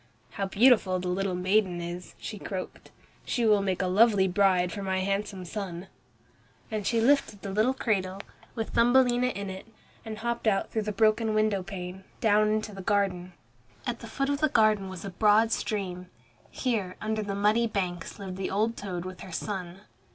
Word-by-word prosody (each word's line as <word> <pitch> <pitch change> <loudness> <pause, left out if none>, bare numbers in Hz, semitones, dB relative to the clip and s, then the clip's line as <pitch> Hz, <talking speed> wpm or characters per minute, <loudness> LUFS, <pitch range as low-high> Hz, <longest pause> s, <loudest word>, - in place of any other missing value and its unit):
"How 195 - -3
beautiful 205 -3 +4
the 180 0 -3
little 190 0 -1
maiden 185 0 +1
is," 175 +1 -6
she 210 - -7
croaked. 190 -2 -6 0.3
"She 240 -3 0
will 210 -2 +5
make 190 -2 -1
a - - 0
lovely 200 0 +4
bride 185 -2 +3
for 200 - -5
my 190 -1 -1
handsome 195 -1 -2
son." 190 -1 -6 0.8
And 215 -2 -2
she 230 - +2
lifted 235 -5 +2
the 195 - -4
little 220 +6 +2
cradle, 195 -6 -1 0.4
with 225 -2 -3
Thumbelina 245 +1 +4
in 200 -5 -4
it, 190 +3 -9 0.4
and 220 -1 -6
hopped 235 +1 -2
out 195 -2 +1
through 220 - 0
the 210 0 -2
broken 215 +1 +2
window 215 -2 +2
pane, 185 0 -7 0.2
down 215 -2 +4
into 215 0 -1
the 195 - -7
garden. 185 -2 0 0.5
At 240 -2 -2
the 230 - -9
foot 275 +5 -2
of 285 0 0
the 310 0 +3
garden 215 -5 +3
was 185 +1 -8
a 195 - -5
broad 215 +4 +4
stream. 185 -5 -3 0.4
Here, 210 -8 -2
under 215 0 -2
the 200 -1 -3
muddy 210 +4 +3
banks 180 -5 -3
lived 190 -2 -7
the 190 - -2
old 220 +4 0
toad 185 -5 -5
with 185 0 -7
her 190 - -9
son. 185 0 -5
200 Hz, 185 wpm, -28 LUFS, 185-220 Hz, 0.8 s, will